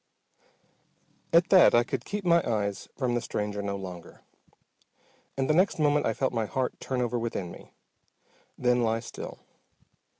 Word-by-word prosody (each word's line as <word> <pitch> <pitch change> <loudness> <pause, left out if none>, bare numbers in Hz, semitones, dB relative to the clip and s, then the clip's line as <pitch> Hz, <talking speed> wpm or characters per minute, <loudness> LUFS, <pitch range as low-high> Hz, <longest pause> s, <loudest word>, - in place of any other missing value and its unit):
At 170 +2 +4
that 185 -9 +7
I 120 - +5
could 130 0 -4
keep 205 -1 -4
my 170 -1 +4
eyes 100 -3 -2
from 125 -3 0
the 120 - 0
stranger 105 -2 -3
no 100 0 -3
longer, 90 -3 -9 1.1
and 135 -1 0
the 155 - +3
next 185 +5 +3
moment 150 -1 +2
I 115 - +1
felt 130 -2 -1
my 115 -2 -1
heart 130 +2 -2
turn 130 -2 -2
over 120 0 -1
within 105 -6 -3
me, - - -14 0.8
then 125 0 +2
lie 115 0 +1
still. 115 - -8
120 Hz, 160 wpm, -28 LUFS, 105-145 Hz, 1.1 s, that